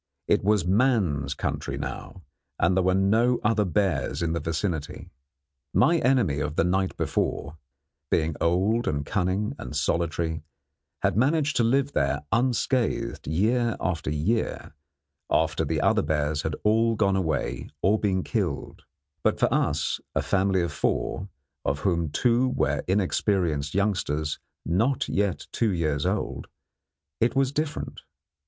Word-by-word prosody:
It - - +2
was 105 -3 +2
man's 95 - +2
country - - -3
now, 90 - -6 0.3
and 95 - +2
there 95 - +3
were 95 0 +2
no 110 +6 +3
other 105 -1 +2
bears 90 -5 0
in 80 -1 0
the 85 - -1
vicinity. 80 0 -3 0.6
My 170 +1 +4
enemy 120 - +2
of 75 0 -2
the - - +3
night 95 +2 0
before, 75 +3 -2 0.5
being 80 -1 +1
old 95 +8 +2
and 70 -1 -1
cunning 95 +4 0
and 65 - -7
solitary, 85 -1 -1 0.6
had - - +2
managed 145 +5 +2
to 120 - +3
live 135 +4 +2
there - - 0
unscathed 125 +2 0
year 115 +7 +1
after 85 -4 -2
year, 80 +9 -1 0.6
after - - +1
the - - -1
other - - +3
bears 75 0 0
had 80 -1 -2
all 115 +2 +3
gone 100 -2 +2
away 80 -9 -2
or 105 +3 +3
been 95 -3 0
killed; - - -3 0.4
but - - +1
for - - +2
us, - - 0 0.2
a - - +1
family 95 -2 +2
of 85 - -2
four, 95 +5 -1 0.3
of 70 +2 -1
whom 85 -5 +1
two 120 - +2
were 130 - 0
inexperienced 90 -5 0
youngsters 80 -7 0 0.3
not 115 +11 +1
yet 100 -2 -1
two 115 - +1
years 75 -5 0
old, - - -2 0.7
it 120 +4 +2
was 135 -1 +2
different. 150 +1 -3
95 Hz, 140 wpm, -26 LUFS, 80-115 Hz, 0.7 s, My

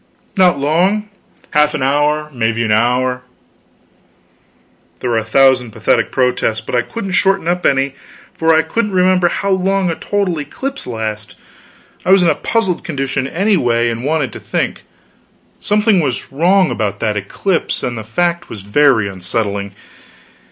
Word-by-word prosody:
"Not 180 -6 +4
long. 180 +9 +1 0.4
Half 150 0 +3
an 145 - -2
hour 150 +2 +1
maybe 115 -1 0
an 110 - 0
hour." 125 +3 +1 1.8
There 125 - -2
were 115 - +2
a - - -4
thousand 125 +1 +3
pathetic - - 0
protests, 125 -4 0
but 110 - -9
I 120 - +3
couldn't 195 - -6
shorten 195 -2 +1
up 180 +1 +1
any, 135 0 +1 0.4
for 165 0 +1
I 160 0 +4
couldn't 210 +5 -2
remember 185 -1 +3
how 200 +3 -1
long 190 -1 +1
a - - -3
total 195 -5 -1
eclipse 270 - -6
lasts. 110 -3 -5 0.7
I - - -3
was 190 -1 +6
in 170 - +4
a - - +4
puzzled 205 -7 -1
condition, 135 -3 -2
anyway, 135 - +1
and 115 +1 -5
wanted 145 -5 -1
to - - -8
think. - - -3 0.8
Something 210 -1 +2
was 135 -6 -2
wrong 180 +6 +3
about 100 -2 -2
that 110 -2 0
eclipse, 160 - -2
and 120 - -2
the 110 - -6
fact 170 +10 -1
was 105 -4 -8
very 115 0 +3
unsettling. 100 +1 -3
145 Hz, 155 wpm, -16 LUFS, 115-180 Hz, 1.8 s, was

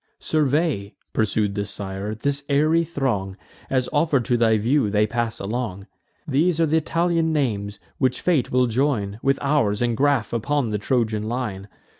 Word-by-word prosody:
"Survey," 150 - 0 0.2
pursued 105 -1 +1
the 100 0 -2
sire, 100 +1 -5
"this 140 +6 -2
airy 155 +4 +3
throng, 120 - -2 0.3
As, 130 -2 +1
offer'd 145 -5 +2
to 120 - +2
thy 115 -2 +3
view, 115 +2 +2
they 105 +1 +3
pass 115 0 -2
along. 100 -2 -4 0.4
These 155 +4 +2
are 165 - +4
th' 155 - -2
Italian 165 +1 +1
names, 105 -9 -1 0.2
which 130 -2 +1
fate 160 -9 +1
will 125 0 +3
join 115 -5 0
With 135 0 +2
ours, 140 -8 +2
and 120 -1 +1
graff 135 -4 +1
upon 125 +1 0
the 105 - -1
Trojan 110 -2 0
line. 110 -6 -3
125 Hz, 160 wpm, -23 LUFS, 105-145 Hz, 0.4 s, are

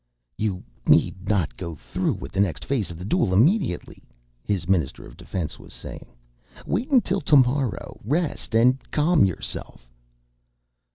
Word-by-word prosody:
"You 100 -4 -2 0.2
need 95 +2 +3
not 95 -7 +1
go 85 -3 -6
through - - -2
with 65 - -8
the 95 - -3
next 100 -4 0
phase 130 -8 0
of 85 - -7
the 90 - -7
duel 115 - +1
immediately," 145 - +2 0.4
his 95 -5 -1
Minister 80 -7 0
of - - -13
Defense 85 -6 -5
was - - -10
saying. - - -9 0.6
"Wait 235 - -1
until 225 -8 +3
tomorrow. 135 -4 +2
Rest 145 - -1
and 125 +3 +5
calm 155 - +4
yourself." 85 -8 -5
105 Hz, 145 wpm, -24 LUFS, 90-145 Hz, 0.6 s, and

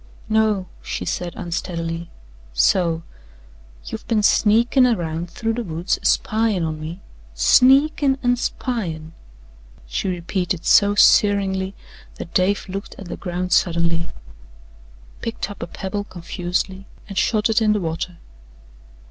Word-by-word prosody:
"No," 215 -3 +2 0.2
she - - -4
said 175 -1 -3
unsteadily. 170 -1 -4 0.4
"So, 165 - +2 0.8
you've - - -7
been 215 -2 +1
sneakin' 235 +5 +4
around 170 -6 -2
through 225 +5 -2
the 240 +1 -3
woods 170 -1 -2
a - - -13
spyin' 215 -4 +1
on 155 -1 -3
me 165 +5 -7 0.3
SNEAKIN' 270 - +4
AN' 245 0 +3
SPYIN'," 175 -11 -3 0.7
she - - -3
repeated 180 0 -2
so 205 0 +5
searingly 195 -2 +4 0.4
that 170 - -8
Dave 190 +2 +1
looked 195 +1 -6
at 195 -3 -9
the - - -4
ground 180 0 -4
suddenly, 170 -1 +2 1.1
picked 230 -2 -4
up 200 - -10
a - - -4
pebble 200 +4 -4
confusedly 180 +2 -4 0.2
and 200 - -8
shot 215 +1 +2
it 225 0 +2
in 215 -1 +4
the 210 - 0
water. 170 0 -4
190 Hz, 130 wpm, -21 LUFS, 170-215 Hz, 1.1 s, so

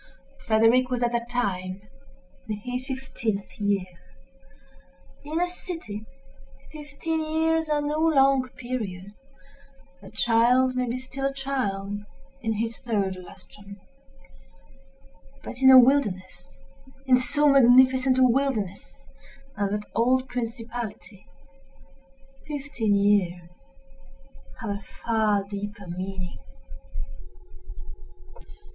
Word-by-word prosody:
Frederick 225 +3 +4
was, 250 -1 -1
at 240 - +1
that 235 0 -2
time, 190 -6 -2 0.7
in 210 - -2
his 250 +3 -5
fifteenth 240 -7 -4
year. 200 -2 +1 1.4
In 305 +3 -3
a 355 - +3
city, 330 - -7 0.6
fifteen 310 +2 -4
years 320 +1 0
are 295 -1 +1
no 300 +1 -1
long 275 -5 +3
period—a 245 0 -9
child 245 +4 +3
may 250 -1 0
be 240 - -2
still 270 +1 -4
a - - -2
child 205 -8 -2 0.4
in 225 -2 -1
his 225 +2 -3
third 205 -6 -1
lustrum: 200 +2 -13 1.6
but 250 - -8
in 265 - +7
a 260 - +10
wilderness—in 240 +1 +1
so 295 +4 +1
magnificent 260 -1 +6
a 260 - +5
wilderness 240 -7 -1 0.5
as 200 -1 -1
that 210 +1 -2
old 255 +4 +2
principality, 230 -4 -6 1.2
fifteen 275 -8 -1
years 185 -4 +1 1.1
have 225 -3 -3
a 200 +1 -4
far 215 -2 0
deeper 205 0 -7
meaning. 185 - -5
240 Hz, 100 wpm, -25 LUFS, 200-270 Hz, 1.6 s, a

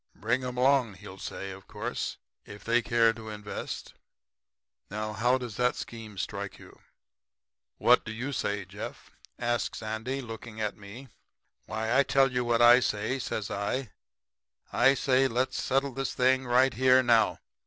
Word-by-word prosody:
"'"Bring 120 +5 0
'em 125 0 -4
along," 130 -4 +3
he'll 95 0 -11
say, 95 +1 -6
of 95 0 -11
course, - - -4 0.3
"if 100 +1 -11
they 120 +1 +2
care 115 -1 +3
to 110 -1 -9
invest." 105 -1 -6 1.0
Now, 105 +1 -4
how 120 +5 +2
does 120 -5 -7
that 125 0 +2
scheme 110 -3 -8
strike 100 0 -4
you?' - - -16 1.0
"'What - - +5
do 110 - -6
you 120 +6 -4
say, 100 -5 -2
Jeff?' 100 +3 -8 0.3
says 120 -1 -1
Andy, 110 +5 -3
looking 115 -2 -8
at 105 -1 -2
me. 105 +6 -11 0.6
"'Why, 110 +1 -3
I'll 130 +4 +5
tell 135 0 +3
you 125 0 0
what 120 0 +2
I 120 +1 +9
say,' 110 +2 -1
says 110 -4 -3
I. 105 +4 -2 0.8
'I 135 +3 +5
say 130 0 +3
let's 125 +2 -1
settle 135 +1 +1
this 135 0 -3
thing 130 0 +2
right 130 +2 +4
here 130 +1 +5
now. 115 -2 +4
120 Hz, 160 wpm, -29 LUFS, 105-130 Hz, 1.0 s, I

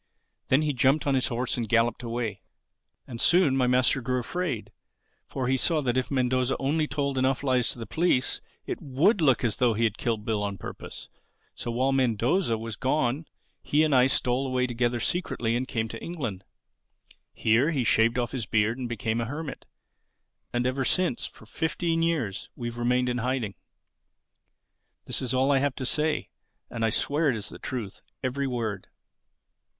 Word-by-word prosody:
Then 135 +4 +4
he 150 -1 +1
jumped 135 +4 +3
on 140 - +2
his 130 -1 +2
horse 125 +1 -1
and 115 -3 -3
galloped 115 +1 +2
away. 115 -2 -3 0.6
"And 120 -3 -5
soon 175 -6 +4
my 130 -2 +2
master 125 +2 +3
grew 125 +2 -1
afraid; 125 - -3 0.6
for 130 -2 -3
he 130 +1 +2
saw 160 +4 +2
that 125 -2 0
if 130 -1 0
Mendoza 130 -1 +1
only 150 +3 0
told 140 -2 -1
enough 130 +1 +1
lies 130 -3 +2
to - - -4
the 115 - -6
police, 160 -5 +1 0.2
it - - -4
would 165 - +2
look 135 -5 +4
as 115 -3 0
though 120 -3 +3
he 115 - 0
had 110 -2 0
killed 110 -3 -1
Bill 110 -2 0
on 100 -1 -2
purpose. - - -8 0.5
So - - -6
while 130 +3 +1
Mendoza 125 - +2
was 115 0 -5
gone 135 +2 0 0.3
he 150 +2 +2
and 155 -2 +2
I 130 -1 +6
stole 130 0 +1
away 130 -1 +1
together 120 0 0
secretly 115 -6 -1
and 130 +2 -1
came 115 -2 -1
to 115 - -7
England. 125 - -5 0.9
Here 115 +7 +2
he 140 -6 0
shaved 115 +1 +3
off 120 -2 -1
his 120 -6 -4
beard 110 +3 +1
and 125 -2 -3
became 115 0 -1
a - - -1
hermit. 145 +4 -6 0.8
And 120 0 0
ever 130 +1 0
since, 180 -1 +1
for - - -15
fifteen 165 +6 -1
years, 145 - -1
we've 120 0 -5
remained 125 +1 +2
in 125 0 0
hiding. 125 -4 -1 1.5
This - - -2
is 130 -1 -1
all 135 +2 +3
I 135 - +4
have 140 -1 0
to 130 - -4
say. 150 +4 0 0.4
And 115 -1 -3
I 115 - +3
swear 145 +7 +1
it 125 - +1
is 105 -1 -5
the - - -10
truth, 115 -7 -5 0.2
every 135 +2 -1
word." 115 -6 -3
125 Hz, 185 wpm, -27 LUFS, 115-140 Hz, 1.5 s, I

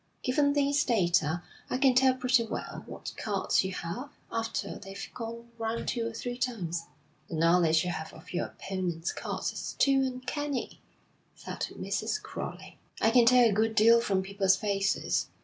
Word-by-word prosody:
Given 285 +2 +2
these 285 0 +2
data, 175 - +2 0.3
I - - 0
can 265 -1 +5
tell 260 +1 +5
pretty 250 -2 +3
well 225 - -5
what - - -7
cards - - +1
you 190 - -3
have, 190 +12 -5 0.2
after 225 0 -3
they've 195 +1 -7
gone 235 0 -7
round 225 +1 -2
two 230 -2 -1
or - - -4
three 245 +2 -5
times.' 175 -10 -2 0.4
'The - - -5
knowledge 165 0 +4
you 180 - -1
have 160 -2 -5
of 160 - -13
your 175 - -1
opponents' 180 -3 -3
cards - - -3
is - - -5
too 275 -1 +4
uncanny,' 265 +2 -3 0.5
said - - -5
Mrs. - - -1
Crowley. - - -7 0.2
'I 225 - +4
can 240 0 +6
tell 250 -1 +7
a 215 - +1
good 220 +2 +1
deal 230 +2 +6
from 195 -4 +1
people's 195 0 +2
faces. 195 0 0
225 Hz, 165 wpm, -29 LUFS, 190-250 Hz, 0.5 s, tell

